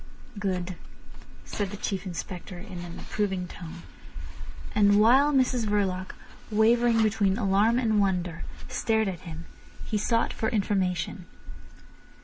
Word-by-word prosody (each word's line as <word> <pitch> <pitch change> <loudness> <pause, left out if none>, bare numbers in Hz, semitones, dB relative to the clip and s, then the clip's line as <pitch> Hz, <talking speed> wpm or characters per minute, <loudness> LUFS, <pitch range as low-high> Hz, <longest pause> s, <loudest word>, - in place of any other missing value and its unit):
"Good," 185 -3 -2 0.7
said 205 -2 -3
the 205 - -7
Chief 195 -1 -3
Inspector 180 +1 -6
in 185 -1 -8
an 175 -1 -7
approving 190 -4 -2
tone. 170 0 -9 0.9
And 205 -1 +5
while 260 +7 +6
Mrs 255 -4 +2
Verloc, 190 -3 -1 0.3
wavering 225 +1 +4
between 205 -2 +2
alarm 210 +2 +3
and 220 -4 +2
wonder, 180 -4 -1 0.2
stared 220 -1 +1
at 185 -3 -3
him, 160 +1 -8 0.4
he 210 - -1
sought 230 +2 +1
for 220 - -1
information. 185 -4 -1
200 Hz, 125 wpm, -27 LUFS, 180-220 Hz, 0.9 s, while